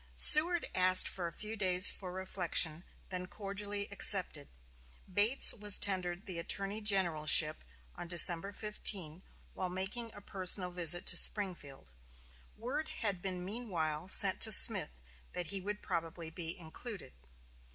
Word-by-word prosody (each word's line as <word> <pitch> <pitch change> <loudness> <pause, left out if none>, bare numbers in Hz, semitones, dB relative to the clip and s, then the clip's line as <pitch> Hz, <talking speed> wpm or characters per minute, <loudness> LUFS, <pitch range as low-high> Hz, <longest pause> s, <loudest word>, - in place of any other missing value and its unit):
Seward 335 +3 +6
asked 185 0 +4
a 175 -3 -6
few 215 +5 -8
days 185 -2 +6
for 185 -2 -10
reflection, 185 -3 0
and 160 +3 -16 0.3
then 180 -1 -7
cordially 200 +1 -5
accepted. 185 -7 0 0.6
Bates 205 +7 +4
was 210 -2 +3
tendered 185 -1 -1
the 180 -3 -7
Attorney 200 +5 -4
Generalship 165 -6 +1 0.3
on 175 - -10
December 175 +2 +2
15, 195 -5 -3 0.3
while 185 - -6
making 200 +6 -6
a 205 - -12
personal 185 -1 0
visit 175 0 +1
to - - +3
Springfield. 160 - -2 0.7
Word 275 +8 -6 0.2
had 195 -4 -1
been 180 -2 -7
meanwhile 180 -7 -6
sent 190 0 +4
to 220 - +2
Smith - - +2 0.3
that 175 -3 -5
he 195 -1 -6
would 210 +2 -8
probably 165 0 -7
be 165 +1 -6
included. 180 - -10
185 Hz, 135 wpm, -31 LUFS, 175-205 Hz, 0.7 s, Seward